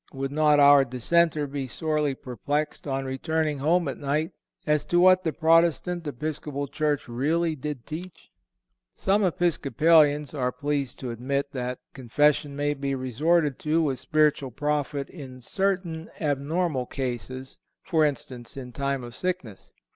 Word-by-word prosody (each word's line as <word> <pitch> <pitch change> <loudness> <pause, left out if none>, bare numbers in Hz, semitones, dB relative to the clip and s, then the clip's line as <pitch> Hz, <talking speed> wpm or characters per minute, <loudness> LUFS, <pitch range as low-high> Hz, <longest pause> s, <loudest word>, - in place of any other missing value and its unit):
Would 135 0 -3
not 150 0 +4
our 145 -1 +8
dissenter 150 +5 +1
be 140 -1 -4
sorely 150 0 -1
perplexed, 145 +5 -3
on 135 -1 -2
returning 150 +3 -1
home 165 +4 +2
at 135 - -4
night, 150 +3 -1 0.3
as 150 -1 +2
to 175 - +2
what 185 +1 +6
the 160 - 0
Protestant 165 +1 +2
Episcopal 145 0 -4
church 150 0 -1
really 155 +7 0
did 145 -3 -6
teach? 175 +3 -9 0.6
Some 200 +2 +1
Episcopalians 155 -4 +3
are 125 -4 -1
pleased 140 -2 -2
to 125 -2 -4
admit 140 +4 -2
that 125 -2 -3 0.2
confession 145 +3 +1
may 145 +1 0
be 140 -1 -2
resorted 145 +4 +1
to 160 +2 +1
with 135 -5 -1
spiritual 150 -3 +2
profit 145 +1 -2
in 130 -7 -10
certain 180 +2 -2
abnormal 145 -1 -1
cases—for 130 - -3
instance, 130 -4 -3
in 125 -2 -7
time 140 +1 -2
of 120 -1 -8
sickness. 125 - -4
145 Hz, 140 wpm, -26 LUFS, 135-160 Hz, 0.6 s, our